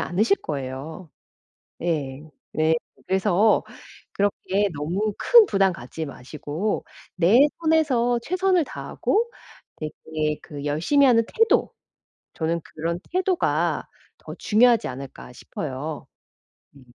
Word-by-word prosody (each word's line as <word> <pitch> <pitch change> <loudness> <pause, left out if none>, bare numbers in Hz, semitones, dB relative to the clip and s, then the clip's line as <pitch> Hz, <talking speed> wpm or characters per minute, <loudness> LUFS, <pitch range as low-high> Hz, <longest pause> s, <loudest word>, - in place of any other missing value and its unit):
않으실 200 +3 +2
거예요. 145 +4 -6 0.7
예. 145 -5 -2 0.3
네. 160 +1 +3 0.3
그래서 195 +2 +3 0.5
그렇게 200 0 0
너무 190 +8 -1
큰 470 -3 +7
부담 195 -2 +2
갖지 155 +4 -6
마시고 150 +8 -4 0.3
내 185 +8 +5 0.2
선에서 280 -7 +2
최선을 365 +2 +2
다하고 455 +10 -1 0.5
되게 155 0 -3
그 145 -2 -8
열심히 175 - +3
하는 230 -2 +4
태도 450 0 +2 0.6
저는 165 +1 -1
'그런 170 +2 -4
태도가 370 -1 +1 0.3
더 - - -9
중요하지 235 +1 +3
않을까?' 130 -1 -9
싶어요. 145 +3 -6 0.7
음. 130 - -16
180 Hz, 225 characters per minute, -24 LUFS, 150-235 Hz, 0.7 s, 큰